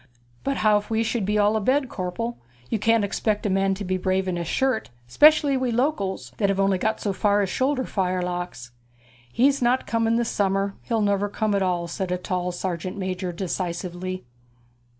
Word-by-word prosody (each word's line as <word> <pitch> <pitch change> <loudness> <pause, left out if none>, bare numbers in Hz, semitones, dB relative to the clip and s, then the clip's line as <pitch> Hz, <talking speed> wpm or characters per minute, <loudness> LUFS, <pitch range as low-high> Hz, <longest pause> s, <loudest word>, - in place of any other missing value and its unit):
'But 275 0 -1
how 210 -1 +5
if 205 - -12
we 225 0 +1
should 225 -2 -1
be 210 0 +1
all 210 +1 +3
abed, 260 +6 +2
corpel? 230 +4 -4 0.4
You 220 - +1
can't 225 +1 +3
expect 210 +1 -1
a 205 - +1
man 195 0 +2
to 200 +1 -6
be 185 +1 0
brave 190 +1 0
in 185 - -1
his 170 -1 -3
shirt, 265 +3 0 0.2
especially 295 - +5
we 260 -1 0
Locals, 225 - -1
that 200 - +2
have 195 0 0
only 195 -1 +2
got 220 +3 0
so 200 - -1
far 205 +1 +2
as 190 - -2
shoulder 260 0 +1
fire 185 -5 -1
locks.' 175 -9 -5 0.6
'He's 275 - +3
not 250 +2 +2
coming 225 +2 +1
this 235 -1 +1
summer. 195 0 0
He'll 230 -2 -1
never 205 0 +1
come 215 +1 -1
at 200 - +1
all,' 175 -2 0
said 180 +2 -4
a 180 - +1
tall 180 0 -2
sergeant 185 +1 -4
major 185 -1 -3
decisively. 180 0 -4
200 Hz, 195 wpm, -24 LUFS, 185-225 Hz, 0.6 s, how